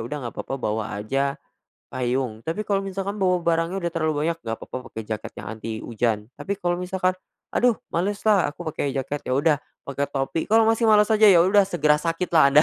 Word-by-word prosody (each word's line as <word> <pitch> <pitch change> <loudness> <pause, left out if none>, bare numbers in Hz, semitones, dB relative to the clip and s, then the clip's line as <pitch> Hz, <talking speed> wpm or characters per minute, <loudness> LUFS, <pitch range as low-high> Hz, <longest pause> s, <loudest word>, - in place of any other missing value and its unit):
udah 125 +4 -5
gak - - -6
papa 135 - -4
bawa 110 -4 -3
aja 135 +6 -1 0.5
payung. 125 -2 -2
Tapi 165 +6 -2
kalau 200 -2 0
misalkan 195 +1 -4
bawa 180 -3 +2
barangnya 165 +2 +1
udah 170 - -1
terlalu 155 -2 0
banyak, 165 +1 0
gak 115 -5 -4
papa - - -7
pake 110 - -7
jaket 110 - -4
yang - - -8
anti 110 0 -6
hujan, 110 -2 -1
tapi 200 - -2
kalau 175 -2 -1
misalkan 185 0 0 0.4
aduh 245 -2 +4 0.2
males 200 +5 -1
lah 210 -4 +4
aku - - -8
pake 140 -2 -2
jaket, 135 +2 -2
ya 130 - 0
udah 150 +2 +3 0.3
pake 140 0 -4
topi. 135 +4 -1
Kalo 225 +1 +5
masih 225 +1 +3
males 210 0 +5
aja, 215 0 +6
ya 175 -4 +7
udah 195 +1 +4
segera 150 -5 +2
sakit 165 +3 -2
lah 160 -2 +5
Anda, 150 - +8
165 Hz, 210 wpm, -24 LUFS, 135-195 Hz, 0.5 s, Anda